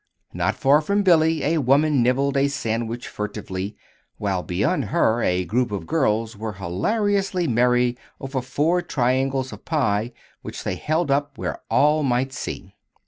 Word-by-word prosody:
Not - - 0
far 145 +3 +4
from 200 +6 +1
Billy 160 -3 +4
a 160 +2 +1
woman 140 +1 +3
nibbled 135 +3 +1
a 140 0 +3
sandwich 115 -3 -3
furtively, 100 -1 -5 0.4
while 95 -3 -1
beyond 100 +9 0
her 110 +3 +2
a 90 -2 +1
group 120 +5 0
of 95 -5 -4
girls 115 - 0
were 110 +1 -5
hilariously 185 - 0
merry 125 0 +2 0.2
over 135 -1 -3
four 150 +8 +1
triangles 130 -3 0
of - - -11
pie 115 -7 0 0.3
which - - -7
they - - -2
held 155 -1 -1
up 145 0 0
where - - -4
all 150 +2 +3
might 130 -1 0
see. 100 -5 -6
130 Hz, 150 wpm, -23 LUFS, 110-150 Hz, 0.4 s, far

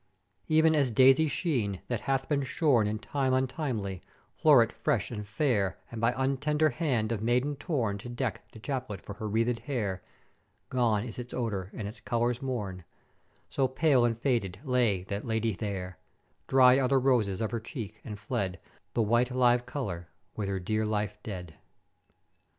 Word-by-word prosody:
"E'en 160 0 +5
as 145 -4 +3
Daisy 135 +6 +5
sheen, 130 - -1
that 120 -3 -2
hath 135 -1 +1
been 145 -2 +1
shorn 135 -6 +2
in 105 +1 -1
time 130 +3 0
untimely, 130 - -2 0.3
floret 130 -7 +5
fresh 125 -10 -1
and 105 -3 -5
fair, 105 -4 0
and 115 -2 -5
by 115 +1 +4
untender 150 +3 +1
hand 120 -7 0
of 110 -3 -2
maiden 125 +6 +1
torn 125 - -1
to 120 - -8
deck 120 0 -3
the - - -13
chaplet 125 -4 -4
for 100 - -8
her 105 +1 -5
wreathèd 115 +2 +1
hair; 115 -7 -3 0.7
gone 115 -5 +2
is 120 0 -7
its 125 0 -7
odor 100 -6 -2
and 105 - -4
its 110 - -8
colours 120 +1 0
mourn; 105 -9 -4 0.6
So 135 -1 +1
pale 130 -1 +3
and 115 -2 +1
faded 115 -8 0
lay 120 -9 +1
that 100 +2 -4
Ladye 110 -1 0
there; 95 -4 -5 0.5
dried 130 0 +6
are 130 - +2
the 135 +1 +3
roses 120 -8 +2
of 110 - -1
her 115 - -1
cheek, 110 -3 -7
and 105 -2 -6
fled 100 -4 -3 0.4
the 115 - +3
white 120 +3 +2
live 125 -1 +3
color, 95 -12 -4 0.3
with 100 -2 -3
her 95 -1 -1
dear 110 +4 -1
life 105 -1 -2
dead. 90 -7 -7
120 Hz, 170 wpm, -29 LUFS, 105-130 Hz, 0.7 s, dried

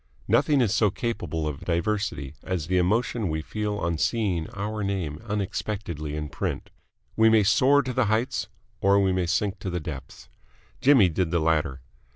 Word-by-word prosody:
Nothing 145 -3 +3
is 110 -4 +2
so 105 -2 +3
capable 90 -8 -3
of 75 -3 -4
diversity 85 -6 -1
as 90 -5 -3
the 90 +2 +1
emotion 105 +2 +1
we 80 0 -2
feel 105 +2 -3
on 85 -3 -1
seeing 95 -8 0
our 105 +2 -4
name 95 -6 -3
unexpectedly 100 -6 -3
in 75 0 -3
print. 70 - -4 0.4
We 110 0 +5
may 110 -1 +5
soar 135 +8 +4
to 125 -1 -4
the - - +2
heights 110 -1 0 0.3
or 100 +1 +4
we 95 -1 +2
may 90 -2 0
sink 100 +2 0
to 95 - -4
the 90 0 -2
depths. 75 -5 -8 0.5
Jimmy 130 -8 +6
did 90 +1 -1
the 85 - +1
latter. 75 -4 0
95 Hz, 175 wpm, -26 LUFS, 80-110 Hz, 0.5 s, Jimmy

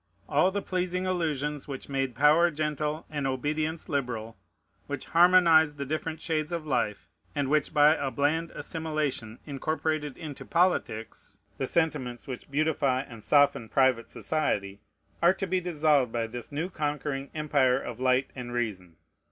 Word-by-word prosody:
All 150 +6 +3
the 200 +1 -3
pleasing 185 0 -1
illusions 150 -6 -1
which 135 -2 -6
made 135 -3 -2
power 155 +4 +5
gentle 150 0 -2
and 145 -3 -2
obedience 155 +5 -2
liberal, 120 -6 -3 0.5
which 145 -2 -5
harmonized 165 -3 +5
the 140 - -3
different 155 +2 -3
shades 160 -1 -2
of 170 -2 -3
life, 115 -8 -1 0.3
and 140 -2 0
which 150 -2 +2
by 150 +1 +6
a 140 -3 -2
bland 150 +6 0
assimilation 150 -8 -3
incorporated 155 0 -2
into 155 -4 -7
politics 165 - -1 0.2
the 135 - -1
sentiments 135 -8 -1
which 130 0 -7
beautify 140 -3 +1
and 115 -5 -11
soften 145 -6 +3
private 130 -4 +2
society, 100 -11 -2 0.4
are 175 +2 +5
to 195 - -2
be 185 0 0
dissolved 150 -7 +2
by 115 -1 -1
this 115 +1 -8
new 160 +6 -3
conquering 145 -3 -3
empire 140 -4 +2
of 120 -3 -7
light 130 +1 +2
and 120 -2 -6
reason. 95 -8 -3
145 Hz, 150 wpm, -28 LUFS, 130-160 Hz, 0.5 s, by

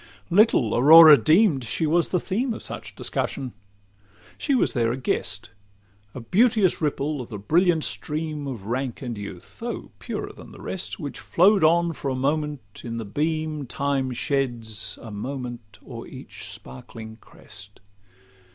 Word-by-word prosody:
Little 180 - +4
Aurora 155 +4 +10
deem'd 155 - +3
she 120 +7 -1
was 165 +2 +2
the 180 - +1
theme 225 +7 -2
Of - - -9
such - - -8
discussion. 130 -3 -3 0.8
She 280 - 0
was 250 - +1
there 115 -3 +1
a 125 - -3
guest; 130 - -2 0.6
A - - -5
beauteous 210 - +3
ripple 150 -1 -1
of 125 - -9
the 105 - -6
brilliant 160 - +2
stream 150 -1 -3
Of 120 -8 -6
rank 125 +3 -3
and 120 -2 -4
youth, 100 -4 -10
though - - -5
purer - - -5
than - - -13
the - - -13
rest, - - -5
Which - - -5
flow'd 195 +1 +3
on 170 +1 +4
for 140 - -4
a 130 - -1
moment 145 -5 -2
in 115 -1 -5
the 115 - -4
beam 155 +4 -2
Time 135 +1 -1
sheds 120 -5 -2
a 115 - -8
moment 120 0 -6
o'er - - -8
each - - -9
sparkling 110 - -10
crest. 105 -2 -15
140 Hz, 155 wpm, -24 LUFS, 115-160 Hz, 0.8 s, Aurora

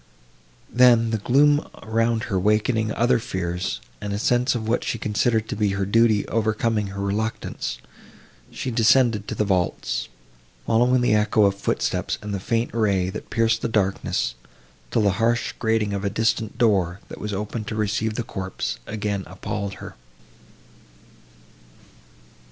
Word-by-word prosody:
Then, 120 -2 +5
the 110 - 0
gloom 145 +7 +4 0.2
around 115 +1 0
her 95 - -2
awakening 110 +3 +1
other 120 +1 +2
fears, 90 -4 -3 0.2
and 100 - -3
a - - -1
sense 125 +4 +2
of 110 -2 -3
what 115 - +1
she - - -2
considered 110 +1 0
to - - -4
be 105 -2 +1
her 100 0 -1
duty 110 0 +3
overcoming 110 -1 0
her 100 0 -7
reluctance, 100 - -3 0.7
she 130 - -4
descended 115 -2 +3
to - - -4
the 105 - 0
vaults, 95 -3 -1 0.6
following 125 +2 +3
the 120 - +3
echo 105 0 +3
of 100 - +3
footsteps 100 - -1
and 105 0 -4
the 100 - -2
faint 115 +4 -1
ray, 100 -5 +1
that 105 - -8
pierced 115 -1 +1
the - - 0
darkness, 100 - 0 0.6
till 110 - +1
the 100 - +4
harsh 120 +1 +1
grating 110 -2 +1
of 100 0 -3
a 100 - +1
distant 110 0 -1
door, 95 -6 +2
that - - -9
was 105 - -3
opened 105 +2 -4
to 110 - -4
receive 110 +1 -1
the 120 - -2
corpse, 95 - -4
again 105 -2 -2
appalled 100 +2 -5
her. - - -9
110 Hz, 155 wpm, -23 LUFS, 100-115 Hz, 0.7 s, Then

